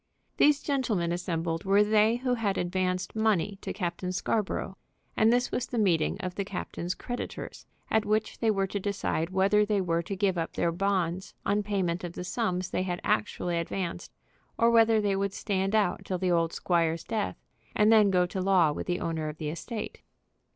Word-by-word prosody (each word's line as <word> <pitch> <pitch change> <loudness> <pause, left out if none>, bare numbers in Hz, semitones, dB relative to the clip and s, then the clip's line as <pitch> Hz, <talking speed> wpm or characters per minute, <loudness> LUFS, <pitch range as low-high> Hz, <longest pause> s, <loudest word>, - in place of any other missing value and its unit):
These 290 -1 +4
gentlemen 230 - 0
assembled 165 -1 -2
were 200 +2 +4
they 215 +2 +4
who 250 +1 -1
had 210 -5 0
advanced 185 +1 -1
money 205 -3 +1
to - - -4
Captain 180 -1 -3
Scarborough, 195 0 -1 0.4
and 220 +1 +4
this 245 0 +1
was 245 - -1
the 245 - -4
meeting 180 -7 +2
of 180 -1 -4
the 200 - -2
captain's 180 -2 -4
creditors, 245 0 -6 0.2
at 220 -1 +3
which 215 +1 -1
they 225 - +2
were 195 -2 +2
to 200 +1 -3
decide 190 -4 -1
whether 195 +3 +3
they 210 -1 +1
were 170 -3 0
to 195 +4 -5
give 190 -2 +1
up 165 - -3
their 170 - +1
bonds 185 0 -1
on 205 +1 +2
payment 190 -4 -1
of 175 -1 -5
the 180 - -6
sums 185 -2 -2
they - - 0
had 180 -1 -2
actually 170 +10 0
advanced, 175 +1 -4 0.5
or 230 0 +4
whether 225 -1 +5
they 205 -2 +1
would 195 0 -1
stand 195 0 -1
out 205 -5 +1
till 185 - -2
the 180 0 0
old 165 -1 +2
squire's 165 -2 0
death, 220 -2 -2 0.4
and 210 +1 +4
then 215 -2 +6
go 180 -2 +3
to 185 +1 -4
law 185 -5 +4
with - - -5
the 175 -1 0
owner 160 -2 -2
of 150 - -8
the 155 -2 -3
estate. 210 +7 -6
190 Hz, 195 wpm, -28 LUFS, 175-210 Hz, 0.5 s, then